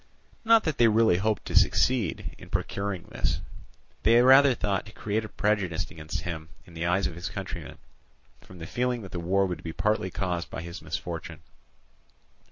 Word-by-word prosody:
Not 230 Hz, -1 st, +5 dB
that 160 Hz, -4 st, -2 dB
they 120 Hz, -, +7 dB
really 110 Hz, -4 st, +4 dB
hoped 105 Hz, +2 st, -1 dB
to -, -, -5 dB
succeed 120 Hz, -9 st, +2 dB
in -, -, -12 dB
procuring 100 Hz, -3 st, -2 dB
this; -, -, -1 dB, 0.6 s
they 115 Hz, +2 st, +5 dB
rather 135 Hz, +1 st, +7 dB
thought 100 Hz, -3 st, -1 dB
to -, -, -11 dB
create 110 Hz, 0 st, -2 dB
a 110 Hz, -, -7 dB
prejudice 95 Hz, -6 st, -1 dB
against 80 Hz, 0 st, -5 dB
him 80 Hz, -2 st, -6 dB, 0.2 s
in 90 Hz, -, -16 dB
the 85 Hz, +1 st, -2 dB
eyes 90 Hz, +3 st, +2 dB
of -, -, -2 dB
his 85 Hz, +2 st, -5 dB
countrymen -, -, -6 dB, 0.6 s
from 90 Hz, -, -14 dB
the 80 Hz, -, -7 dB
feeling 125 Hz, +1 st, -1 dB
that 95 Hz, -, -10 dB
the 90 Hz, -, -4 dB
war 95 Hz, +3 st, +2 dB
would 90 Hz, -2 st, -4 dB
be 80 Hz, -, -6 dB
partly 105 Hz, -1 st, 0 dB
caused 90 Hz, -3 st, -3 dB
by 80 Hz, -, -6 dB
his 85 Hz, +1 st, -8 dB
misfortune. 80 Hz, -2 st, -5 dB
95 Hz, 180 wpm, -27 LUFS, 85-110 Hz, 0.6 s, they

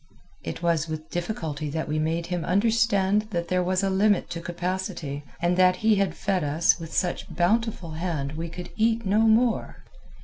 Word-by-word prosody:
It 85 Hz, -, -6 dB
was 165 Hz, -2 st, +1 dB
with 155 Hz, 0 st, -6 dB
difficulty 165 Hz, -5 st, -3 dB
that 160 Hz, +2 st, -3 dB
we 155 Hz, +1 st, -1 dB
made 165 Hz, +2 st, -1 dB
him 175 Hz, -1 st, -3 dB
understand 210 Hz, +1 st, +2 dB
that 170 Hz, -4 st, -3 dB
there 180 Hz, 0 st, +2 dB
was 185 Hz, +2 st, 0 dB
a 195 Hz, -, +2 dB
limit 200 Hz, +1 st, +2 dB
to 170 Hz, -, -4 dB
capacity, 175 Hz, -4 st, -4 dB, 0.2 s
and 175 Hz, +1 st, +1 dB
that 185 Hz, 0 st, +5 dB
he 220 Hz, -2 st, +5 dB
had 195 Hz, -1 st, 0 dB
fed 190 Hz, -4 st, 0 dB
us 150 Hz, +5 st, +2 dB
with 165 Hz, -1 st, -8 dB
such 180 Hz, -, -1 dB
bountiful 200 Hz, -1 st, 0 dB
hand 155 Hz, -4 st, -3 dB
we 165 Hz, +2 st, -5 dB
could 175 Hz, +2 st, -8 dB
eat 225 Hz, +1 st, +2 dB
no 200 Hz, +3 st, +2 dB
more. 225 Hz, +1 st, +2 dB
180 Hz, 180 wpm, -25 LUFS, 165-200 Hz, 0.2 s, that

